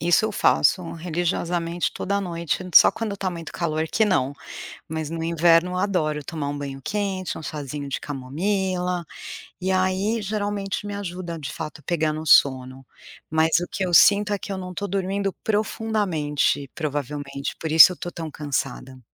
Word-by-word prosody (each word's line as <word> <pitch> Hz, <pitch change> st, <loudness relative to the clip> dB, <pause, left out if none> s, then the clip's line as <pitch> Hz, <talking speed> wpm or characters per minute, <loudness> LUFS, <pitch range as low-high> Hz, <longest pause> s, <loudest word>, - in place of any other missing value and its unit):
isso 175 Hz, +6 st, +3 dB
eu 220 Hz, -, 0 dB
faço 200 Hz, -2 st, +3 dB
religiosamente 170 Hz, 0 st, -1 dB
toda 200 Hz, +1 st, -1 dB
noite, 170 Hz, -2 st, -2 dB
só -, -, +9 dB
quando 215 Hz, -3 st, -4 dB
tá 195 Hz, -1 st, -2 dB
muito 170 Hz, -2 st, -6 dB
calor 160 Hz, -2 st, -1 dB
que 220 Hz, -, +2 dB
não, 145 Hz, -10 st, +1 dB, 0.6 s
mas 160 Hz, -1 st, -3 dB
no 165 Hz, 0 st, -4 dB
inverno 170 Hz, +1 st, +4 dB
eu 180 Hz, -, -2 dB
adoro 170 Hz, -6 st, 0 dB
tomar 145 Hz, -1 st, -4 dB
um 145 Hz, -, -4 dB
banho 135 Hz, -1 st, -6 dB
quente, 195 Hz, -2 st, -2 dB
um -, -, -7 dB
chazinho 145 Hz, -1 st, -5 dB
de 140 Hz, -, -3 dB
camomila, 180 Hz, +6 st, -2 dB, 0.6 s
e 190 Hz, -, 0 dB
aí 190 Hz, +4 st, +1 dB
geralmente 205 Hz, -1 st, -2 dB
me 205 Hz, -, -4 dB
ajuda 180 Hz, -3 st, -5 dB
de 140 Hz, -4 st, -6 dB
fato 155 Hz, -2 st, -7 dB
pegar 160 Hz, -3 st, 0 dB
no 155 Hz, +1 st, -5 dB
sono, 130 Hz, -2 st, +4 dB, 0.5 s
mas 160 Hz, +1 st, +2 dB
o 175 Hz, -, -4 dB
que 190 Hz, -, -1 dB
eu 175 Hz, -, -3 dB
sinto 205 Hz, +3 st, +6 dB
é 200 Hz, -, -1 dB
que 200 Hz, -, -7 dB
eu 195 Hz, -, -3 dB
não 180 Hz, -1 st, -6 dB
tô 200 Hz, +3 st, -3 dB
dormindo 195 Hz, +1 st, -1 dB
profundamente, 205 Hz, -10 st, 0 dB
provavelmente, 145 Hz, -2 st, -4 dB
por 160 Hz, -, -3 dB
isso 160 Hz, +3 st, +10 dB
eu -, -, -6 dB
tô 175 Hz, -, -5 dB
tão 160 Hz, -2 st, -6 dB
cansada. 135 Hz, -3 st, -4 dB
170 Hz, 170 wpm, -24 LUFS, 150-190 Hz, 0.6 s, isso